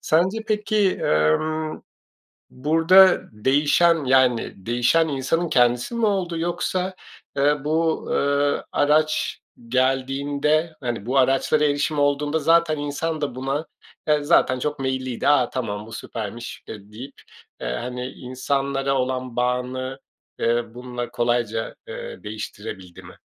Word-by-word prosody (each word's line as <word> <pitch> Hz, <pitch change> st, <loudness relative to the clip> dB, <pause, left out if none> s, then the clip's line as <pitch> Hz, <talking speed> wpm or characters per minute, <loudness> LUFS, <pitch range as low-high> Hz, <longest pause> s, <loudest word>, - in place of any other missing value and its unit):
Sence 185 Hz, +7 st, +2 dB
peki, 210 Hz, -2 st, +2 dB
emm, 155 Hz, -, +1 dB, 0.7 s
burada 165 Hz, +7 st, +5 dB
değişen 145 Hz, +7 st, +3 dB
yani 130 Hz, -2 st, +3 dB
değişen 125 Hz, +8 st, +2 dB
insanın 155 Hz, +5 st, -1 dB
kendisi 120 Hz, -, +2 dB
mi 235 Hz, -, +1 dB
oldu? 185 Hz, -5 st, 0 dB
Yoksa, 180 Hz, +2 st, -2 dB, 0.4 s
eee, 145 Hz, 0 st, +2 dB
bu, 160 Hz, +1 st, 0 dB
eee, 140 Hz, 0 st, +1 dB
araç 155 Hz, +1 st, +1 dB, 0.3 s
geldiğinde, 140 Hz, +5 st, 0 dB
hani, 120 Hz, -5 st, -3 dB
bu 130 Hz, +3 st, 0 dB
araçlara 135 Hz, +3 st, +3 dB
erişim 145 Hz, +1 st, 0 dB
olduğunda 145 Hz, +2 st, +1 dB
zaten 165 Hz, -1 st, +3 dB
insan 150 Hz, +2 st, -3 dB
da 140 Hz, -4 st, -2 dB
buna 135 Hz, +4 st, -2 dB, 0.4 s
yani 150 Hz, -1 st, +2 dB
zaten 130 Hz, -5 st, +3 dB
çok 150 Hz, +1 st, -3 dB
meyilliydi. 130 Hz, -2 st, -2 dB
A, 140 Hz, -4 st, +4 dB
tamam 105 Hz, -4 st, -4 dB
bu -, -, -12 dB
süpermiş, 115 Hz, +1 st, -7 dB
ııı, 105 Hz, -1 st, -10 dB
deyip, 130 Hz, +6 st, -9 dB, 0.5 s
eee, -, -, -3 dB
hani, 125 Hz, -, -4 dB
insanlara 135 Hz, +2 st, -2 dB
olan 130 Hz, -1 st, -2 dB
bağını, 125 Hz, +2 st, -2 dB, 0.4 s
eee, 120 Hz, +1 st, +1 dB
bununla 125 Hz, -1 st, -6 dB
kolayca, 120 Hz, -2 st, -1 dB
ııı, -, -, -8 dB
değiştirebildi 105 Hz, -4 st, -8 dB
mi? -, -, -14 dB
140 Hz, 120 wpm, -23 LUFS, 125-155 Hz, 0.7 s, burada